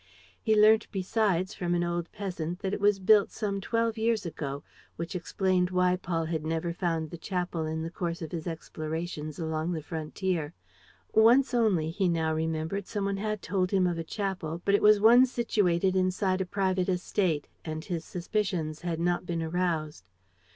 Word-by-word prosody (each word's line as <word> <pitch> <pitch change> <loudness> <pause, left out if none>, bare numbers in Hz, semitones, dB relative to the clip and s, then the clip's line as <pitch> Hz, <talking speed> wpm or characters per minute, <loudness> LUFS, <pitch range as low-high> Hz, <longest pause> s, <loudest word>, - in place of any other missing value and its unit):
He 220 -1 +3
learnt 215 +1 +6
besides 190 -1 0
from 175 -1 -1
an 175 - +1
old 175 0 -2
peasant 180 -4 -4
that 190 0 -1
it - - -1
was 205 -1 +4
built 205 +1 +5
some 200 -2 -3
twelve 230 +1 0
years 225 -2 +1
ago, 145 -3 -5 0.3
which 170 +3 -5
explained 180 +1 +1
why 180 0 +2
Paul 170 -3 -2
had 160 -1 -2
never 165 +2 -2
found 165 -3 -2
the 170 - -7
chapel 175 -3 -2
in 160 0 -3
the 165 - -5
course 170 -1 -3
of 160 - -6
his 165 -1 -4
explorations 155 -1 -5
along 160 +1 -2
the 160 -3 -4
frontier. 160 0 -3 0.6
Once 240 +5 +5
only, 195 -10 +2
he 190 +1 +1
now 160 -2 +1
remembered, 160 +4 -2
some 205 -2 -2
one 200 0 -1
had 215 -1 -3
told 185 0 0
him 190 -2 +2
of 175 -2 0
a - - -2
chapel; 180 -3 -3
but 200 - +3
it 205 - +4
was 210 0 +6
one 240 +5 +7
situated 195 -7 +1
inside 185 +1 +1
a 185 - -2
private 190 -1 0
estate; 180 -4 0 0.2
and 155 0 -5
his 170 -4 -3
suspicions 175 -4 -2
had 170 -2 -2
not 175 +1 0
been 165 -1 -2
aroused. 160 - -2
180 Hz, 180 wpm, -28 LUFS, 165-200 Hz, 0.6 s, one